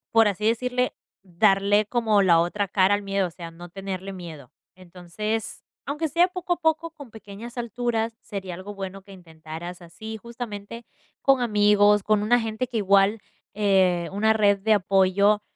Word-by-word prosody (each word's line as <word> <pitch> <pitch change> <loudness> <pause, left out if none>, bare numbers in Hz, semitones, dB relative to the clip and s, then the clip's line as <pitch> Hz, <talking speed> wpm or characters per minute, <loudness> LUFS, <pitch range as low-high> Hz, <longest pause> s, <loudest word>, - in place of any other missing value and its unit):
Por 225 -1 +6
así 205 +1 -2
decirle, 250 +2 0 0.3
darle 200 +3 +2
como 220 -2 +2
la 175 -4 +5
otra 200 +4 -1
cara 195 0 +3
al 205 - -4
miedo, 195 -1 -1
o - - -11
sea, 170 0 -9
no 175 +1 -12
tenerle 195 +1 -6
miedo. 165 -8 -10 0.2
Entonces, 185 +5 -5 0.2
aunque 300 +3 -2
sea 340 +5 +3
poco 365 -1 -2
a - - -5
poco, 320 0 +1
con 285 -7 -13
pequeñas 220 +3 -10
alturas, 230 -1 -2
sería 195 -5 -6
algo 195 +3 -9
bueno 195 0 -7
que 195 - -14
intentaras 170 0 -9
así, 220 +6 -9
justamente 230 -1 -8 0.4
con 270 -2 +3
amigos, 210 -2 +4
con 210 0 +2
una 240 +3 +3
gente 225 +2 -3
que 240 -1 -4
igual 200 +1 +3 0.3
eh, 190 -4 +2
una 215 +3 +2
red 205 -2 +3
de 220 +3 +2
apoyo 200 +1 +3
205 Hz, 165 wpm, -24 LUFS, 190-225 Hz, 0.4 s, Por